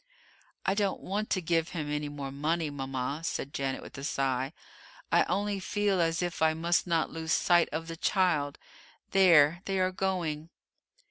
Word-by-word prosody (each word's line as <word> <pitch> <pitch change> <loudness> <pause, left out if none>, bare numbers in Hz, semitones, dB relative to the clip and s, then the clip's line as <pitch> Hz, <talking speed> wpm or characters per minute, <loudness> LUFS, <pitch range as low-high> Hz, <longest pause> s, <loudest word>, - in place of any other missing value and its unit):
"I 190 - +3
don't 200 -1 0
want 210 +3 -3
to 185 - 0
give 165 0 +1
him 150 -2 -2
any 150 0 -2
more 140 -2 -6
money, 155 +3 -1
mama," 135 +1 -3
said 140 -3 -3
Janet, 135 -1 -2
with - - -11
a - - -7
sigh. 135 -1 -1 0.6
"I - - +5
only 205 0 -1
feel 200 -1 0
as 165 +1 +1
if 175 -2 -3
I 160 0 +4
must 170 +2 +1
not 165 -2 +1
lose 160 0 -4
sight 175 -1 +4
of 165 +1 -3
the 165 - -5
child 160 -7 +1 0.5
there 170 -4 +6
they 195 -1 -1
are 185 0 +2
going!" 175 -5 -2
165 Hz, 175 wpm, -29 LUFS, 145-185 Hz, 0.6 s, there